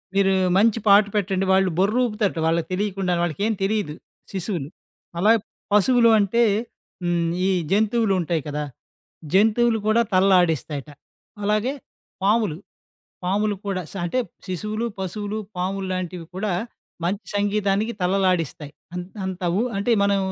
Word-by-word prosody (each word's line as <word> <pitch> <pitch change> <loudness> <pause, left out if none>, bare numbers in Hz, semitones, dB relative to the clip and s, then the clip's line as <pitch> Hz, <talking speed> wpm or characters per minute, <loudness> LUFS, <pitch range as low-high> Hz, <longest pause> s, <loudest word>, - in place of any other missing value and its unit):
మీరు 195 -1 +4 0.3
మంచి 225 +2 +4
పాట 200 +1 +8
పెట్టండి 195 -2 0
వాళ్ళు 190 0 +4
బొర్ర 200 +4 +2
ఊపుతారట. 210 -6 -1
వాళ్ళకి 165 0 +1
తెలియకుండా 195 -1 -1
వాళ్ళకేం 200 +7 0
తెలీదు. 195 -6 -1 0.4
శిశువులు, 180 -6 -3 0.5
అలాగే 220 +5 +5 0.3
పశువులు 230 +3 +5
అంటే, 210 +4 +3 0.6
హ్మ్, 175 -1 +1 0.2
ఈ - - +2 0.2
జంతువులు 215 +1 +2
ఉంటాయి 170 -1 -1
కదా! 150 0 -2 0.7
జంతువులు 225 +3 +4
కూడా 220 +2 +4
తలలాడిస్తాయట. 175 -6 +2 0.5
అలాగే 215 +6 +1 0.5
పాములు, 205 -5 +2 0.7
పాములు 205 +3 +1
కూడా 190 -2 -1
శ్ - - -14
అంటే 175 +9 -1 0.3
శిశువులు, 215 +5 -3
పశువులు, 205 +3 -4 0.2
పాములు 190 +2 -2
లాంటివి 180 -2 -4
కూడా 200 0 -1 0.5
మంచి 195 +4 -1
సంగీతానికి 205 +1 +1
తలలాడిస్తాయి. 180 -6 0 0.2
అంత్ 180 +3 -7
అంతవు 185 +1 -1
అంటె 200 +4 +1
మనం 200 0 +2
195 Hz, 120 wpm, -23 LUFS, 180-210 Hz, 0.7 s, పాట